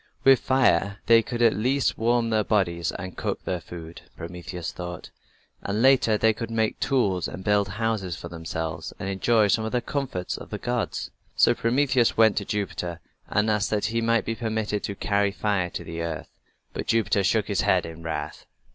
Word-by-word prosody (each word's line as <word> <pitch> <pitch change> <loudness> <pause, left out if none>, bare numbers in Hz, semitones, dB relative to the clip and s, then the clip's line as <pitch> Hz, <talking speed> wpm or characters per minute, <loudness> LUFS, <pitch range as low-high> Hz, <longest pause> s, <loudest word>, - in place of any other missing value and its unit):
"With 135 -1 +7
fire 100 -7 +2
they 115 0 +6
could 120 +1 -2
at 115 - +6
least 130 +5 +1
warm 115 0 +1
their 110 -1 +2
bodies 85 -6 0
and 95 0 -7
cook - - -3
their 90 -2 -2
food," 85 0 -9 0.2
Prometheus 90 0 -6
thought, 90 -1 -7 0.5
"and 105 +3 -1
later 130 -5 +5
they 110 +1 +3
could 115 +1 -5
make 110 -1 0
tools 100 - +1
and 95 - -8
build 105 -1 +2
houses 105 -3 -2
for 85 - -8
themselves 80 -1 -5
and - - -5
enjoy 105 +3 +3
some 110 +3 +2
of 110 - -3
the 125 - +3
comforts 125 -10 -3
of - - -10
the - - -4
gods." 120 -2 -2 0.2
So - - +5
Prometheus 125 0 +2
went 110 -2 +5
to 100 - -1
Jupiter 90 -5 -3 0.3
and 105 +1 +2
asked 105 0 +1
that 105 -1 0
he 115 - +1
might 115 0 +2
be 115 - -1
permitted 110 -2 -2
to 100 - -4
carry 100 0 +1
fire 100 -3 0
to - - -6
the 85 0 -6
earth. 80 -2 -4 0.4
But - - -5
Jupiter 110 -3 +2
shook - - +2
his - - +1
head - - +2
in 80 0 -9
wrath. 80 0 -5
105 Hz, 190 wpm, -25 LUFS, 90-115 Hz, 0.5 s, With